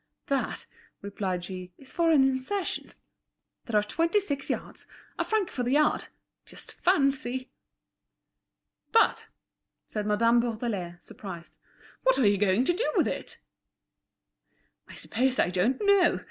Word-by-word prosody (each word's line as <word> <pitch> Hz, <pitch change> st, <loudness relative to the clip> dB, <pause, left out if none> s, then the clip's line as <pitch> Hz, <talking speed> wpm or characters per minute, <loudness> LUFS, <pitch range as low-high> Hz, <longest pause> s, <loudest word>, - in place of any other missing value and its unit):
"That," 275 Hz, -1 st, -1 dB, 0.4 s
replied 190 Hz, -3 st, -3 dB
she, 185 Hz, -1 st, -7 dB
"is 270 Hz, -, -10 dB
for 335 Hz, -1 st, +2 dB
an 300 Hz, -4 st, +6 dB
insertion. 270 Hz, +9 st, -1 dB, 0.7 s
There 220 Hz, -4 st, +2 dB
are -, -, -1 dB
twenty 330 Hz, -, +1 dB
six 285 Hz, -8 st, -3 dB
yards—a -, -, -5 dB
franc 430 Hz, -4 st, 0 dB
the 250 Hz, -, -2 dB
yard. 300 Hz, +3 st, +2 dB, 0.4 s
Just -, -, -12 dB
fancy!" 275 Hz, -6 st, +1 dB, 1.4 s
"But," 455 Hz, -, +3 dB, 0.6 s
said 210 Hz, -1 st, -4 dB
Madame 230 Hz, +3 st, +4 dB
Bourdelais, 220 Hz, -7 st, -2 dB
surprised, 170 Hz, -6 st, -9 dB, 0.5 s
"what -, -, +3 dB
are 260 Hz, -, +3 dB
you 200 Hz, -1 st, +4 dB
going 205 Hz, +4 st, +3 dB
to 350 Hz, -, +3 dB
do 440 Hz, +8 st, 0 dB
with -, -, +4 dB
it?" -, -, -5 dB, 1.5 s
"I'm -, -, -12 dB
sure 260 Hz, +2 st, +1 dB
I 175 Hz, -, -3 dB
don't 190 Hz, +9 st, +1 dB
know. 400 Hz, -3 st, +4 dB
250 Hz, 130 wpm, -28 LUFS, 205-305 Hz, 1.5 s, an